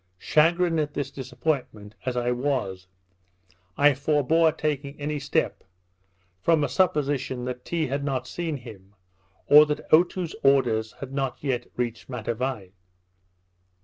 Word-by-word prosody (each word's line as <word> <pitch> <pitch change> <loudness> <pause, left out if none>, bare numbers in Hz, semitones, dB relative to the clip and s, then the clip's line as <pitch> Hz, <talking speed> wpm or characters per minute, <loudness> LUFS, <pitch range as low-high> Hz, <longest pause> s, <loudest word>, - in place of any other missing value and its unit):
Chagrined 165 - +2
at 150 -1 -2
this 135 -2 -3
disappointment 125 -5 -3
as 125 -1 -1
I 120 0 +1
was, 120 -8 -2 0.9
I 145 +1 +6
forbore 155 +4 +2
taking 145 -2 -3
any 150 +1 -2
step, - - -1 0.8
from 165 -3 +3
a 145 - 0
supposition 140 -6 0
that 125 0 -5
Tee 165 -2 -1
had 140 +1 -2
not 130 -3 -2
seen 165 +1 -4
him, 105 -5 -13 0.5
or 150 +1 +8
that 150 0 -3
Otoo's 175 +1 +3
orders 120 -5 +2
had 135 -1 -9
not 135 -2 -2
yet 125 -4 -1
reached 120 -1 -3
Matavai. 120 -4 -3
135 Hz, 130 wpm, -25 LUFS, 125-150 Hz, 0.9 s, or